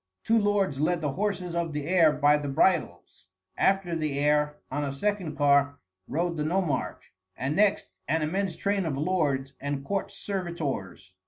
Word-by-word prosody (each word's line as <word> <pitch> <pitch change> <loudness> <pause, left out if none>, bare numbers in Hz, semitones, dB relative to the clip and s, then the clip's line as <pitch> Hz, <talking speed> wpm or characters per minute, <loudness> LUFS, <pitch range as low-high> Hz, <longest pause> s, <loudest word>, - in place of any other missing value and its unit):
Two 225 0 +3
lords 200 -8 +1
led 170 +3 +1
the 150 -3 -1
horses 185 0 -2
of 170 -2 -2
the 150 -1 -3
heir 165 -2 +5
by 150 0 +4
the 145 -1 -2
bridles. 95 - 0 0.3
After 195 -3 +1
the 155 -3 -2
heir, 150 +1 +2 0.2
on 145 +2 -1
a 140 - -2
second 190 +2 -2
car, 140 0 +3 0.3
rode 170 +2 -1
the 150 - -1
nomarch, 160 -4 -2 0.2
and 135 +4 -2
next 205 0 +2 0.2
an 160 +2 +1
immense 185 +3 -1
train 200 -3 0
of 140 -4 -2
lords 145 -5 0
and 140 0 -3
court 195 +3 -2
servitors. 155 - -5
155 Hz, 165 wpm, -27 LUFS, 145-185 Hz, 0.3 s, heir